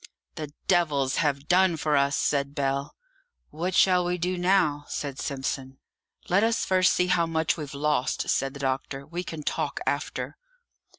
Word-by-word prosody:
"The 150 -2 -6 0.2
devils 145 -7 +2
have 140 -2 0
done 180 -1 +4
for 150 -1 +1
us!" 140 0 +2
said 140 -1 0
Bell. 140 -1 -1 0.6
"What 175 +5 -2
shall 180 -1 +5
we 175 0 -1
do 180 +2 -1
now?" 175 -5 +2
said 140 -2 -4
Simpson. 135 -1 -4 0.5
"Let 195 +4 +3
us 225 0 +1
first 185 -1 +3
see 180 - +2
how 180 -2 +2
much 160 -1 +1
we've 145 -3 -7
lost," 145 -2 0
said 135 +1 0
the - - -8
doctor; 135 0 -2
"we 170 +4 -5
can 160 -3 -7
talk - - -2
after." - - -3
150 Hz, 165 wpm, -26 LUFS, 140-180 Hz, 0.6 s, shall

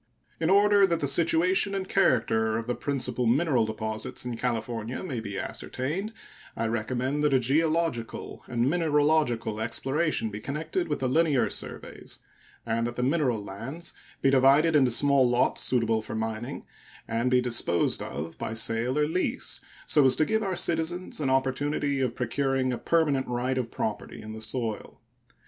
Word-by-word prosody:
In 160 - 0
order 200 0 +5
that 170 -2 0
the 145 - 0
situation 170 +6 +3
and 190 -1 -3
character 110 - +2
of 115 - -4
the 125 - -1
principal 125 -1 -1
mineral 130 -2 +2
deposits 110 +2 -4
in 120 -1 -3
California 115 - -3
may 135 -10 -4
be 100 -3 -6
ascertained, 155 - -3 0.5
I 115 - -1
recommend 125 +5 -1
that 145 -2 +3
a - - +5
geological 155 -1 -1
and 120 0 0
mineralogical 150 -8 +1
exploration 135 +2 -1
be 105 - -6
connected 155 - -3
with 150 -3 -3
the 130 - +1
linear 150 -1 +2
surveys, - - -6 0.5
and 115 0 0
that 120 - -6
the 125 - -2
mineral 130 -6 +1
lands 125 - -7 0.3
be 135 - +4
divided 140 +5 +5
into 135 -4 +5
small 135 +1 +4
lots 120 +1 +1
suitable 115 -3 +1
for 110 - -6
mining 110 +4 -4 0.4
and 115 +2 0
be 125 0 +4
disposed 120 -8 +1
of 80 +3 -6
by 110 - -4
sale 115 +4 +1
or 150 0 +2
lease, 180 +4 -1 0.2
so 150 - +5
as 130 -1 +5
to 155 - +2
give 220 +4 0
our 195 -3 -2
citizens 175 +1 0
an 140 -3 0
opportunity 135 +1 0
of 125 -3 -1
procuring 130 +1 0
a 120 - -4
permanent 150 -5 +1
right 125 +2 -1
of 120 -2 -3
property - - -4
in 110 0 -8
the 110 - -8
soil. 110 -1 -4
130 Hz, 165 wpm, -27 LUFS, 115-155 Hz, 0.5 s, order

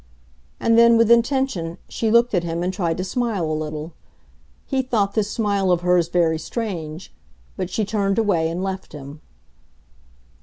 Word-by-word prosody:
And 230 0 +3
then, 235 0 +6
with 230 0 +4
intention, 235 -8 +1
she 225 - -2
looked 235 +1 +4
at 180 -3 +1
him 170 0 -3
and 185 +1 -1
tried 170 -4 -1
to 185 - -2
smile 215 -2 -1
a 155 - -2
little. 155 +1 -5 0.7
He 265 -1 0
thought 220 -6 0
this 215 -2 0
smile 200 -4 0
of 175 -1 +2
hers 180 -1 +3
very 170 -2 +1
strange; 175 -6 -5 0.4
but 185 - -3
she 210 +3 -1
turned 200 -1 0
away 180 -8 +2
and 175 +3 -3
left 190 0 -5
him. 145 +1 -10
190 Hz, 165 wpm, -22 LUFS, 165-225 Hz, 0.7 s, then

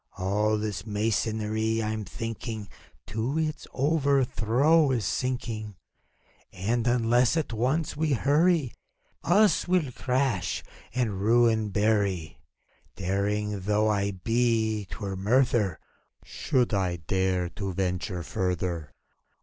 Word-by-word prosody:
All 105 +3 +1
this 105 -2 -3
masonry, 110 +1 0
I'm 110 0 -3
thinking, 110 +1 -5 0.4
To 115 +9 -2
its 155 -1 -2
overthrow 140 0 +2
is 120 -6 0
sinking; 110 0 -3 0.8
And, 115 +6 -1
unless 120 +3 +3
at 155 -7 -2
once 135 +9 0
we 155 -1 +1
hurry. 150 +2 +2 0.5
Us 200 +3 +3
will 175 -7 +1
crash 125 -8 -1 0.3
and 110 -7 -1
ruin 110 0 +3
bury. 100 -5 0 0.6
ACT - - -19
II. - - -4
71 90 - -1 0.4
Daring 100 - -3
though 105 +3 +1
I 100 -1 +1
be, 110 +1 0
't - - -9
were 100 -2 -4
murther 105 -2 +2 0.5
Should 125 -3 0
I 95 -3 +1
dare 90 +2 -1
to 100 +1 -4
venture 90 -1 -2
further. 90 -5 -2
110 Hz, 115 wpm, -27 LUFS, 100-125 Hz, 0.8 s, unless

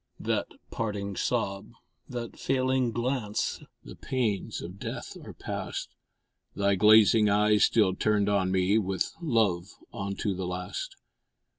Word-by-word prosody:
That - - -1 0.2
parting 105 -3 -3
sob, 100 +4 -2 0.4
that 120 -2 -5
failing 130 -2 +1
glance 120 -2 -2 0.2
The - - -10
pains 115 -4 -2
of 90 +3 -8
death - - -6
are - - -9
past! - - -5 0.7
Thy 100 0 +2
glazing 105 +2 +6
eyes 105 0 +4
still 105 -5 +3
turned 105 +1 +1
on 100 -2 +2
me 95 +3 +3
With 95 -3 -1
love 105 - +1 0.2
unto 100 +1 -2
the 95 -1 -4
last! 90 0 -5
105 Hz, 125 wpm, -28 LUFS, 95-115 Hz, 0.7 s, glazing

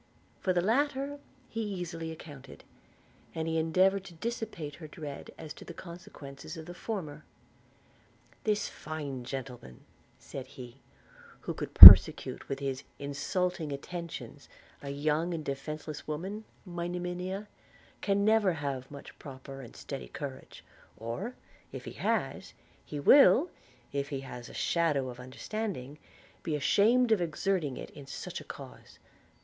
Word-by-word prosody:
For 185 - 0
the 175 -1 +1
latter 280 +5 0 0.3
he 225 - -5
easily 175 -5 -5
accounted; 145 -4 -12 0.7
and 160 0 -3
he 160 0 0
endeavoured 185 +4 +2
to 175 - -12
dissipate 210 -7 -5
her 160 - -9
dread 150 -3 -8
as 155 -2 -8
to - - -13
the 170 - -10
consequences 160 -3 -10
of 160 - -8
the 175 - -9
former. 165 -7 -6 1.2
'This 210 -1 0
fine 145 -5 -6
gentleman,' 125 - -8 0.3
said 135 -1 -9
he, 125 -1 -11 0.6
'who - - -4
could - - -7
persecute - - +12
with 135 - -2
his 135 -1 -4
insulting 155 +3 -2
attentions 170 +4 -7 0.3
a 140 - -7
young 155 +4 -1
and 155 -2 -6
defenceless 150 +2 -6
woman, 190 +8 -5 0.2
my 175 -2 -4
Monimia, 180 +3 -4 0.5
can 200 0 +1
never 215 -4 +3
have 140 -4 -4
much 140 -1 -11
proper 135 0 -10
and 120 - -12
steady - - -7
courage; - - -8 0.3
or, 150 - -5 0.4
if - - -8
he - - -6
has, - - -2 0.3
he 145 - -6
will, 280 - +6 0.4
if 140 0 -2
he 135 -3 -4
has 125 -3 -9
a - - -12
shadow 150 -6 0
of 125 0 -10
understanding, 145 - -6 0.4
be 155 - -2
ashamed 225 - +3
of 215 -4 +3
exerting 170 -3 -1
it - - -8
in 140 -2 -12
such 140 - -7
a - - -11
cause. - - -12
160 Hz, 140 wpm, -30 LUFS, 140-185 Hz, 1.2 s, persecute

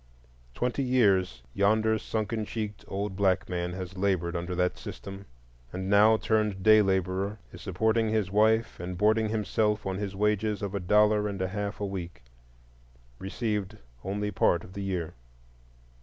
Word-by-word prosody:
Twenty 125 +3 -1
years 105 -8 +2
yonder 110 +2 +2
sunken 110 +1 -2
cheeked, 105 -1 -5
old 100 0 -3
black 95 -1 +1
man 90 -1 -3
has 95 0 -6
labored 95 -3 0
under 85 +1 -3
that 90 0 +1
system, 100 0 -8 0.4
and 95 +2 -4
now, 105 +2 +6
turned 105 -4 0
day 110 +1 +7
laborer, 95 +1 0 0.2
is - - -10
supporting 110 +4 +1
his 110 -3 0
wife 110 +2 +2
and 90 +1 -5
boarding 110 +2 +3
himself 105 0 0
on 95 -1 -2
his 100 -1 -4
wages 105 +1 0
of 100 -1 -3
a 100 - -1
dollar 105 +3 +3
and 100 -2 -4
a 95 -1 -1
half 100 +1 -4
a 105 - -2
week, 90 -9 -6 1.0
received 105 +1 -3 0.3
only 105 +2 -2
part 85 -4 +2
of 90 - -12
the 100 - -5
year. 90 -4 -3
100 Hz, 155 wpm, -28 LUFS, 95-110 Hz, 1.0 s, day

